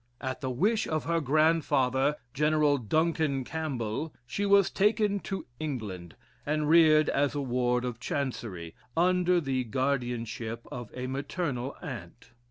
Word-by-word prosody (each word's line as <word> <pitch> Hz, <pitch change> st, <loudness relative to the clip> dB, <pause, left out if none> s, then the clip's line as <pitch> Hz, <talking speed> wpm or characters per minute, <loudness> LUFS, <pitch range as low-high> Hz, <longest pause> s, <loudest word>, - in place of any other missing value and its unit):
At 130 Hz, -1 st, -4 dB
the 130 Hz, -, -2 dB
wish 205 Hz, -, +1 dB
of 155 Hz, -1 st, -1 dB
her 165 Hz, 0 st, 0 dB
grandfather, 145 Hz, -2 st, +2 dB, 0.2 s
General 150 Hz, 0 st, +3 dB
Duncan 155 Hz, +2 st, +1 dB
Campbell, 145 Hz, -2 st, -3 dB
she 200 Hz, +11 st, -2 dB
was 200 Hz, -1 st, +5 dB
taken 205 Hz, 0 st, +2 dB
to 195 Hz, 0 st, -5 dB
England, 105 Hz, -, -5 dB, 0.3 s
and 150 Hz, 0 st, 0 dB
reared 155 Hz, -1 st, +6 dB
as 140 Hz, +1 st, +1 dB
a 145 Hz, -, -1 dB
ward 125 Hz, -1 st, 0 dB
of 120 Hz, -2 st, -4 dB
Chancery, 115 Hz, -11 st, -4 dB, 0.2 s
under 180 Hz, +1 st, +3 dB
the 135 Hz, -5 st, -1 dB
guardianship 120 Hz, -2 st, -2 dB
of 120 Hz, -3 st, -6 dB
a 125 Hz, 0 st, -4 dB
maternal 135 Hz, 0 st, -3 dB
aunt. 120 Hz, -5 st, -8 dB
140 Hz, 135 wpm, -29 LUFS, 125-160 Hz, 0.3 s, reared